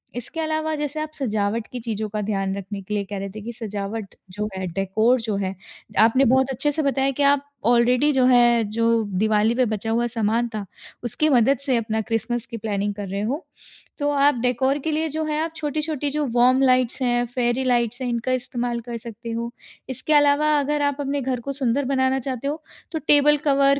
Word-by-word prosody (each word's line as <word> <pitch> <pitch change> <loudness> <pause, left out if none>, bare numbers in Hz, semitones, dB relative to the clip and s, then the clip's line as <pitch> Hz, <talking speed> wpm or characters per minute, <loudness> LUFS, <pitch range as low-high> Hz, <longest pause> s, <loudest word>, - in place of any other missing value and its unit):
इसके 245 +6 -5
अलावा 315 0 -1
जैसे 295 0 -3
आप 310 0 -4
सजावट 220 -4 -1
की 250 - -5
चीज़ों 220 -2 -3
का 210 0 -3
ध्यान 195 -2 -1
रखने 200 +1 -6
के 210 +3 -6
लिए 205 - 0
कह 200 +1 -6
रहे 195 - -4
थे 215 +3 -9
कि 235 +3 -6
सजावट 210 -2 -5 0.2
जो 210 +2 -3
है, 190 - -3
डेकोर 220 +6 +2
जो 220 -3 -2
है, 190 -1 -2 0.4
आपने 230 +5 +5
बहुत 265 +2 +3
अच्छे 275 +3 0
से 310 - -1
बताया 275 0 +1
कि 285 +2 -1
आप 285 0 -3 0.2
आलरेडी 245 +4 +4
जो 260 -2 +3
है 240 -2 +5
जो 230 0 +1 0.3
दिवाली 215 +1 +3
पे 255 - +3
बचा 220 0 -3
हुआ 235 +1 +1
सामान 230 +1 0
था 205 - -4 0.4
उसकी 245 +6 0
मदद 260 0 +4
से 265 -3 +2
अपना 220 -1 -1
क्रिस्मस 230 +2 -2
की 230 -3 -7
प्लानिंग 205 -1 -2
कर 205 -2 -5
रहे 200 +2 -3
हो। 270 +10 -2 0.5
तो 290 -1 0
आप 285 -1 +4
डेकोर 260 +3 +1
के 315 +3 -2
लिए 315 +1 0
जो 315 +2 -2
है 305 0 -1
आप 330 - -4
छोटी-छोटी 300 -1 -2
जो 300 0 -1
वार्म 255 +2 +5
लाइट्स 255 0 +2
हैं, 240 -1 +2
फेयरी 245 +1 0
लाइट्स 245 -1 +1
हैं 255 - -1
इनका 235 +2 -1
इस्तेमाल 245 -1 -2
कर 235 0 -6
सकते 230 +1 -8
हो। 235 +1 -3 0.4
इसके 260 +4 -1
अलावा 290 +1 +4
अगर 295 +1 0
आप 285 -1 +1
अपने 280 0 -1
घर 255 -1 -2
को 275 - -4
सुंदर 270 0 0
बनाना 265 0 +1
चाहते 260 +1 -4
हो 305 +2 -3 0.3
तो 320 - -2
टेबल 295 0 +6
कवर, 280 -1 +3
245 Hz, 210 wpm, -23 LUFS, 225-280 Hz, 0.5 s, टेबल